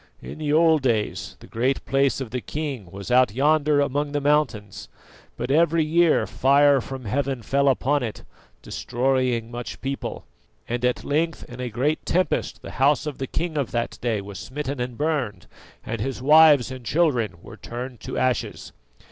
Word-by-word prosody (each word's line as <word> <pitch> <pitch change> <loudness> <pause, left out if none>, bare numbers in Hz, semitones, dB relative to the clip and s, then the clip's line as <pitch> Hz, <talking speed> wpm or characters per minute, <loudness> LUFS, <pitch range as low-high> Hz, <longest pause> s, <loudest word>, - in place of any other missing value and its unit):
In - - -9
the 150 -2 -1
old 160 0 +4
days 115 -5 -1
the - - -12
Great 130 +4 -1
Place 135 0 +1
of 130 -5 -6
the 125 0 -3
king 140 - -5
was 100 +5 -8
out 125 -4 +4
yonder 150 +1 +3
among 145 +1 0
the 145 - +1
mountains, 135 -9 0 0.5
but 130 - -3
every 165 +1 +3
year 165 +1 +3
fire 140 +1 +4
from 130 0 -7
heaven 130 +2 -2
fell 140 +5 +1
upon 140 +2 +1
it, 115 -4 -5 0.4
destroying 125 -2 -1
much 120 0 -6
people: 135 +1 -5 0.4
and 120 +1 -3
at 125 0 0
length 160 +2 -1
in 120 0 -11
a 125 -1 -3
great 135 +7 -1
tempest 180 +2 -1
the - - -7
house 145 +3 +4
of 150 -3 -5
the 135 - -3
king 165 0 -2
of 135 - -1
that 120 0 -3
day 115 -4 0
was 100 0 -9
smitten 140 0 -5
and 125 -1 -4
burned, 145 -8 -2 0.4
and 115 - -4
his 135 +2 -3
wives 150 -1 +6
and 130 -1 -8
children 125 - +1
were 115 - -11
turned 125 +2 -7
to - - -6
ashes. 130 -1 -1
135 Hz, 175 wpm, -24 LUFS, 120-150 Hz, 0.5 s, wives